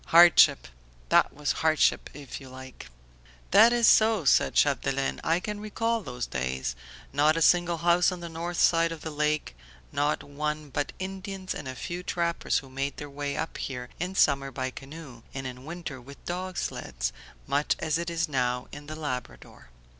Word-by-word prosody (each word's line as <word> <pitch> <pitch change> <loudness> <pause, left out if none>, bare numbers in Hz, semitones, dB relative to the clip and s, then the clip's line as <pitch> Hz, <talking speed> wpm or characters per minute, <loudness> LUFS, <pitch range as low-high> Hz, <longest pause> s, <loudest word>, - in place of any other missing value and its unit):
Hardship! 165 - +7 0.4
That - - +4
was 145 0 -2
hardship 160 -1 +3
if 140 -1 -8
you 135 - -11
like." 130 0 -11 0.6
"That 235 - +8
is 240 -1 +3
so," 220 -7 +5
said - - +4
Chapdelaine, 135 -1 +1
"I 165 +1 +2
can 210 +2 -5
recall 225 +2 -1
those 125 - -5
days. 65 -1 -3 0.4
Not 150 +3 +3
a - - 0
single 175 0 +4
house 175 +2 +3
on 180 - -5
the 170 - -6
north 170 +1 -4
side 165 0 +4
of 165 -2 -7
the 160 - -5
lake: 150 - -1 0.4
no 145 +1 +1
one 150 0 -4
but 145 +2 -2
Indians 190 0 -5
and 145 - -7
a 130 - -5
few 175 +7 -5
trappers 170 -1 0
who 135 - -5
made 135 +2 -3
their 145 -1 -7
way 145 0 -3
up 160 - -4
here 125 -2 -5
in 180 +3 -3
summer 140 -5 +3
by 130 0 -3
canoe 135 -3 -10
and 135 -1 -4
in 125 0 -7
winter 160 -5 -6
with 140 +3 -14
dog 180 +1 -4
sleds, - - -3 0.3
much 140 +2 +1
as 155 +1 -1
it 170 0 -3
is 165 0 -1
now 125 -3 -1
in 145 0 -10
the 155 - -6
Labrador." 125 - -6
150 Hz, 180 wpm, -27 LUFS, 135-170 Hz, 0.6 s, That